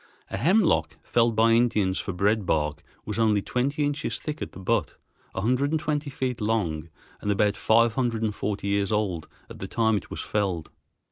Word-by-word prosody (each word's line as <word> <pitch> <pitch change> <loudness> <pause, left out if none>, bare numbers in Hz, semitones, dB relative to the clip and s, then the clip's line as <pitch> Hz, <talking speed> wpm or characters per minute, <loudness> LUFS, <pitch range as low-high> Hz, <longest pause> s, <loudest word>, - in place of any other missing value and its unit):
A - - -2
hemlock, 140 - +2
felled 115 -1 +2
by 115 +1 +4
Indians 110 -5 +2
for - - -3
bread 105 +4 +1
bark, 75 -4 0 0.2
was 105 +1 -3
only 105 -3 +3
twenty 140 +4 0
inches 145 +1 -2
thick 150 0 -6
at - - -4
the - - -10
butt, 95 - 0 0.4
a - - -1
hundred 125 +6 +1
and 160 +1 +1
twenty 150 -1 -2
feet 130 -4 -3
long, 85 -8 -1 0.3
and 105 - -3
about 100 0 +2
five 115 0 +3
hundred 120 -3 0
and 110 -1 0
forty 100 0 -3
years 100 +1 +1
old 95 -7 -1 0.2
at - - -11
the - - -5
time 110 -2 +2
it - - -7
was - - -4
felled. 95 -6 -2
110 Hz, 195 wpm, -26 LUFS, 100-125 Hz, 0.4 s, by